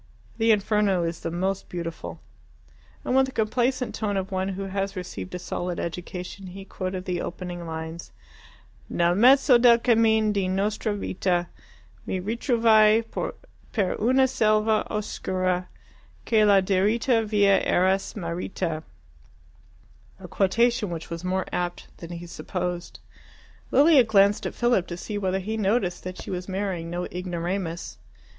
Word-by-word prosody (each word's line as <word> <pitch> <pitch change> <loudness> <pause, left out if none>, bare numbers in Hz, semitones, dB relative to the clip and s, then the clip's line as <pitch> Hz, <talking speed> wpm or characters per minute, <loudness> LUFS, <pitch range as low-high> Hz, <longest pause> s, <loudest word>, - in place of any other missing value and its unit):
The 225 0 +2
'Inferno' 205 -3 +2
is 165 0 -3
the - - -4
most 190 +3 -2
beautiful." 165 - -6 0.9
And 255 - 0
with 265 0 +4
the - - -7
complacent 250 +2 0
tone 205 -2 -2
of 190 0 -3
one 190 0 -1
who 195 0 -4
has 195 +1 -3
received 180 0 -6
a - - -2
solid 175 0 -4
education, 180 +2 -6
he 190 +2 -9
quoted 185 -1 -5
the 180 -1 -2
opening 175 -1 -6
lines 160 +1 -6 0.8
Nel 170 0 +2
mezzo 250 +4 +6
del 235 -1 +7
cammin 220 -2 +3
di 195 -2 0
nostra 205 +3 -1
vita 180 -3 -1 0.6
Mi 190 - -1
ritrovai 225 0 +3 0.7
per 200 -5 0
una 260 +4 +4
selva 215 -2 +2
oscura 185 -3 -2 0.6
Che 220 -2 +4
la 200 -2 +6
diritta 215 +5 +2
via 205 -2 +3
era 185 +2 +3
smarrita 170 -3 -4 1.4
a - - -9
quotation 230 +3 +1
which 170 -1 -6
was 170 +1 -5
more 185 0 -1
apt 175 0 -4
than 170 - -9
he 175 0 -7
supposed. 175 0 -5 0.7
Lilia 290 -2 +6
glanced 205 -1 +3
at - - -7
Philip 240 -7 +2
to 175 - -6
see 205 +3 -4
whether 190 -1 0
he 215 +4 -3
noticed 195 -3 0
that 185 0 -6
she - - -7
was 180 +1 -4
marrying 190 -3 -3
no 175 +1 -3
ignoramus. 175 - -4
190 Hz, 140 wpm, -25 LUFS, 180-215 Hz, 1.4 s, del